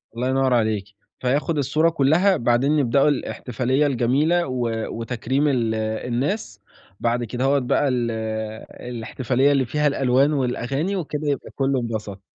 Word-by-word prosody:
الله 125 Hz, +2 st, -1 dB
ينّور 130 Hz, -1 st, +2 dB
عليكِ، 110 Hz, -4 st, +1 dB, 0.3 s
فياخد 145 Hz, +5 st, 0 dB
الصورة 155 Hz, +4 st, +2 dB
كلّها 165 Hz, +6 st, +3 dB
بعدين 120 Hz, +4 st, +2 dB
يبدأوا 135 Hz, +2 st, +3 dB
الإحتفالية 130 Hz, 0 st, -1 dB
الجميلة 145 Hz, +7 st, +1 dB
و 125 Hz, -2 st, -1 dB, 0.2 s
وتكريم 125 Hz, +5 st, -1 dB
ال 120 Hz, -5 st, +1 dB
الناس، 115 Hz, -, -2 dB, 0.4 s
بعد 120 Hz, +1 st, 0 dB
كدهوة 130 Hz, +5 st, +1 dB
بقى 135 Hz, +2 st, +1 dB
ال 120 Hz, -3 st, 0 dB, 0.6 s
الاحتفالية 125 Hz, +3 st, -1 dB
اللي 135 Hz, -2 st, +2 dB
فيها 150 Hz, +5 st, 0 dB
الألوان 135 Hz, +1 st, +2 dB
والأغاني 135 Hz, +6 st, -1 dB
وكده 155 Hz, -5 st, -3 dB
يبقى 140 Hz, -3 st, -3 dB
كلّه 135 Hz, -1 st, +1 dB
انبسط. 110 Hz, -4 st, -5 dB
130 Hz, 130 wpm, -22 LUFS, 120-145 Hz, 0.6 s, كلّها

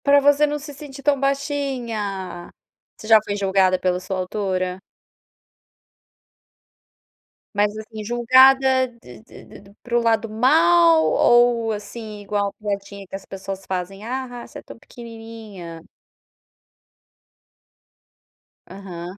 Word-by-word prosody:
Pra 285 Hz, 0 st, +6 dB
você 290 Hz, +1 st, +4 dB
não 295 Hz, 0 st, -2 dB
se 290 Hz, 0 st, -9 dB
sentir 275 Hz, -1 st, -11 dB
tão 285 Hz, -1 st, +2 dB
baixinha. 240 Hz, -, -3 dB, 0.5 s
Você 215 Hz, -, -11 dB
já 220 Hz, -1 st, +7 dB
foi 205 Hz, -, -3 dB
julgada 190 Hz, -2 st, +2 dB
pela 180 Hz, -1 st, 0 dB
sua 185 Hz, +1 st, -4 dB
altura? 185 Hz, -1 st, -2 dB, 2.7 s
Mas, 205 Hz, 0 st, +1 dB
assim, 215 Hz, 0 st, -8 dB
julgada 260 Hz, +3 st, +5 dB, 0.2 s
de 120 Hz, -3 st, -13 dB
de -, -, -15 dB, 0.2 s
de 200 Hz, 0 st, -18 dB
para 240 Hz, -1 st, 0 dB
o -, -, +2 dB
lado 225 Hz, -1 st, +1 dB
mal, 170 Hz, -8 st, +4 dB
ou 235 Hz, +6 st, +3 dB
assim, 210 Hz, 0 st, -8 dB
igual 200 Hz, 0 st, -2 dB
piadinha 200 Hz, -1 st, -5 dB
que 195 Hz, -, -9 dB
as 195 Hz, -, -9 dB
pessoas 195 Hz, 0 st, -7 dB
fazem, 190 Hz, +2 st, -5 dB
a 260 Hz, +2 st, -3 dB, 0.2 s
ha, -, -, -12 dB
você -, -, -10 dB
é -, -, -13 dB
tão -, -, -13 dB
pequenininha. 225 Hz, -9 st, -10 dB, 2.9 s
Aham. 180 Hz, -1 st, -9 dB
210 Hz, 120 wpm, -22 LUFS, 190-245 Hz, 2.9 s, já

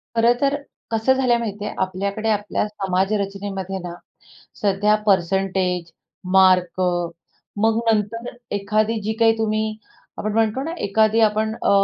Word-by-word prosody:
खरंतर 245 Hz, +5 st, +3 dB, 0.4 s
कसं 225 Hz, +3 st, +3 dB
झालं 260 Hz, -2 st, +1 dB
आहे -, -, +4 dB
माहिती 210 Hz, -2 st, -4 dB
आहे, -, -, -5 dB
आपल्याकडे 200 Hz, +4 st, -2 dB
आपल्या 210 Hz, 0 st, 0 dB
समाजरचनेमध्ये 195 Hz, -1 st, -2 dB
ना, 175 Hz, -1 st, -5 dB, 0.7 s
सध्या 205 Hz, +1 st, +3 dB
पर्सेंटेज, 185 Hz, -2 st, +1 dB, 0.4 s
मार्क, 185 Hz, -1 st, +4 dB, 0.8 s
मग 220 Hz, +2 st, +2 dB
नंतर 220 Hz, +2 st, -1 dB, 0.3 s
एखादी 215 Hz, +2 st, 0 dB
जी 220 Hz, +2 st, -1 dB
काही 225 Hz, 0 st, +6 dB
तुम्ही, 215 Hz, 0 st, -1 dB, 0.4 s
आपण 215 Hz, -, -2 dB
म्हणतो 225 Hz, +4 st, +1 dB
ना, 325 Hz, -, -4 dB
एखादी 220 Hz, +2 st, +3 dB
आपण 220 Hz, 0 st, +2 dB
अ, -, -, +2 dB
210 Hz, 125 wpm, -21 LUFS, 195-220 Hz, 0.8 s, काही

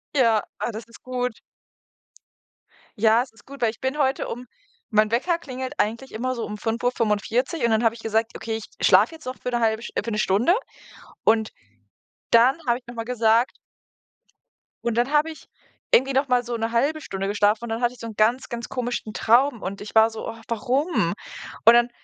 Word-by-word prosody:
Ja. 230 Hz, -5 st, +4 dB, 0.2 s
Ah, -, -, -2 dB
das 220 Hz, +1 st, -7 dB
ist 230 Hz, -, -16 dB
gut. 250 Hz, -1 st, -2 dB, 1.7 s
Ja, 220 Hz, +2 st, +4 dB
es 255 Hz, -, -15 dB
ist 225 Hz, -, -22 dB
gut, 280 Hz, +1 st, -12 dB
weil 230 Hz, -2 st, +3 dB
ich 220 Hz, -, -17 dB
bin 265 Hz, +3 st, -2 dB
heute 270 Hz, -2 st, +1 dB
um 245 Hz, +1 st, -6 dB, 0.5 s
mein 215 Hz, 0 st, +4 dB
Wecker 335 Hz, +9 st, +1 dB
klingelt 260 Hz, -4 st, -6 dB
eigentlich 230 Hz, +5 st, -1 dB
immer 255 Hz, +3 st, -2 dB
so 235 Hz, -, -3 dB
um 210 Hz, -, -6 dB
05:45 230 Hz, +4 st, 0 dB
und 235 Hz, -, +3 dB
dann 220 Hz, +1 st, +2 dB
habe 225 Hz, 0 st, +3 dB
ich 230 Hz, -, -12 dB
gesagt: 225 Hz, +1 st, 0 dB
„Okay, 225 Hz, -1 st, -3 dB
ich 220 Hz, -, -8 dB, 0.2 s
schlafe 325 Hz, -, +5 dB
jetzt 315 Hz, -, -15 dB
noch 255 Hz, 0 st, -5 dB
für -, -, -2 dB
'ne 240 Hz, -1 st, 0 dB
1/2 220 Hz, 0 st, +1 dB
sch -, -, -7 dB
äh, -, -, 0 dB
für 230 Hz, -, -4 dB
'ne 210 Hz, -, -1 dB
Stunde“, 215 Hz, -, +3 dB, 0.7 s
und 220 Hz, 0 st, +3 dB, 0.8 s
dann 240 Hz, +5 st, +6 dB
habe 240 Hz, 0 st, +3 dB
ich 250 Hz, -1 st, -18 dB
noch 240 Hz, -, -9 dB
mal 230 Hz, -, -3 dB
gesagt 230 Hz, 0 st, +2 dB, 1.3 s
Und 235 Hz, -2 st, -1 dB
dann 245 Hz, +3 st, +2 dB
habe 300 Hz, +1 st, +3 dB
ich 315 Hz, -, -13 dB, 0.5 s
irgendwie 270 Hz, +2 st, +5 dB
noch 270 Hz, +2 st, +2 dB
mal 250 Hz, -1 st, +3 dB
so 240 Hz, 0 st, -4 dB
'ne 225 Hz, 0 st, -2 dB
1/2 285 Hz, +7 st, +1 dB
Stunde 195 Hz, -6 st, -4 dB
geschlafen 205 Hz, +2 st, +2 dB
und -, -, -7 dB
dann 225 Hz, +1 st, -3 dB
hatte 240 Hz, 0 st, +1 dB
ich 250 Hz, -, -17 dB
so 230 Hz, -, -6 dB
'n 225 Hz, -, -7 dB
ganz, 230 Hz, +5 st, +2 dB
ganz 235 Hz, 0 st, -5 dB
komischen 245 Hz, -3 st, -3 dB
Traum 240 Hz, +3 st, +3 dB
und 195 Hz, +2 st, -5 dB
ich 205 Hz, -, -8 dB
war 220 Hz, 0 st, +6 dB
so: 225 Hz, -1 st, -7 dB
„Oh, 225 Hz, -, -8 dB
warum?“ 260 Hz, +9 st, 0 dB, 0.5 s
Und 230 Hz, -, +10 dB
dann 240 Hz, 0 st, +4 dB
235 Hz, 210 wpm, -24 LUFS, 220-255 Hz, 1.7 s, Und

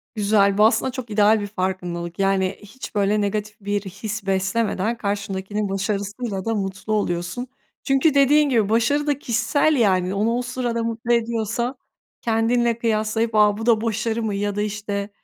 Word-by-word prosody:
Güzel, 200 Hz, -1 st, +3 dB
bu 210 Hz, -, +6 dB
aslında 255 Hz, +3 st, +2 dB
çok 250 Hz, -2 st, -7 dB
ideal 210 Hz, +1 st, +4 dB
bir 205 Hz, -, -4 dB
farkındalık. 180 Hz, -3 st, -4 dB
Yani, 195 Hz, -1 st, +1 dB
hiç 215 Hz, +2 st, -10 dB
böyle, 205 Hz, +1 st, +2 dB
negatif 210 Hz, +1 st, -2 dB
bir 205 Hz, 0 st, -1 dB
his 200 Hz, +2 st, -6 dB
beslemeden, 195 Hz, +3 st, 0 dB
karşındakinin 200 Hz, -1 st, -3 dB
başarısıyla 200 Hz, +1 st, -3 dB
da 225 Hz, -, 0 dB
mutlu 195 Hz, +1 st, -3 dB
oluyorsun. 180 Hz, +4 st, -2 dB, 0.4 s
Çünkü, 270 Hz, +2 st, +3 dB
dediğin 285 Hz, +1 st, +4 dB
gibi, 225 Hz, -6 st, +2 dB
başarı 235 Hz, +7 st, +2 dB
da 290 Hz, -2 st, +1 dB
kişisel 245 Hz, +6 st, +1 dB
yani, 190 Hz, -6 st, +2 dB
onu, 210 Hz, +3 st, +1 dB
o 245 Hz, -, 0 dB
sırada 245 Hz, -2 st, -2 dB
mutlu 230 Hz, +1 st, -1 dB
ediyorsa, 235 Hz, +2 st, -1 dB, 0.5 s
kendinle 230 Hz, +1 st, +1 dB
kıyaslayıp 220 Hz, 0 st, 0 dB
"A, 210 Hz, -1 st, +4 dB
bu 225 Hz, -, -5 dB
da 225 Hz, -2 st, +4 dB
başarı 225 Hz, 0 st, -1 dB
mı?" 210 Hz, -2 st, -1 dB
ya 205 Hz, 0 st, -2 dB
da, 205 Hz, -, -1 dB
işte, 205 Hz, -1 st, -3 dB
215 Hz, 160 wpm, -22 LUFS, 200-235 Hz, 0.5 s, bu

